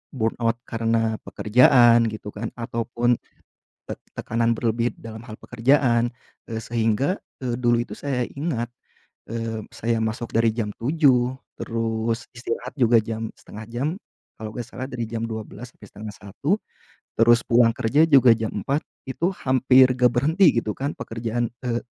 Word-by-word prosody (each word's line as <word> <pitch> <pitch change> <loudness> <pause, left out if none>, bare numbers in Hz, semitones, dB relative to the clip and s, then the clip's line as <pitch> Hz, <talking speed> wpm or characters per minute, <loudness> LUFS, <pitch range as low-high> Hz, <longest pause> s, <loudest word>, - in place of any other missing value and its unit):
burn 115 -3 +1
out 115 0 +2
karena 115 -1 0
pekerjaan 120 0 +5
gitu 105 -1 -7
kan 110 +2 -4
ataupun, 120 +1 0 0.7
tek - - -4 0.2
tekanan 115 +1 0
berlebih 115 +1 0
dalam 110 -1 -9
hal - - -8
pekerjaan, 120 -1 +2 0.4
eee, 115 0 -4
sehingga, 115 - 0 0.3
eee, 120 -2 -1
dulu 120 -1 +2
itu - - -10
saya 135 -3 -1
ingat, 140 -6 -3 0.6
eee, 115 -1 -3
saya 115 0 -1
masuk 110 +1 -3
dari 115 0 +4
jam 105 -3 -2
7.00 130 -2 +2 0.2
terus 115 0 -2
istirahat 120 +1 -4
juga 120 -2 +5
jam 110 0 -4
setengah 110 +1 -10
jam 125 +5 -1 0.5
kalau 110 - -5
enggak 120 - -3
salah 130 +3 -6
dari 120 -3 -3
jam 115 0 -3
12.00 110 +1 -7
sampai 105 - -14
12:30 105 - -3 0.6
terus 115 +1 +5
pulang 120 0 +5
kerja 140 +9 +3
juga 130 -5 +7
jam 110 -1 -2
4.00 140 +3 0 0.3
itu 165 +7 -1 0.2
hampir 130 0 +5
enggak 125 -1 +4
berhenti 155 +4 +4
gitu 110 -2 -1
kan 140 +2 -2
pekerjaan, 115 +1 -3 0.2
eee, 120 -1 -1
115 Hz, 150 wpm, -23 LUFS, 115-125 Hz, 0.7 s, juga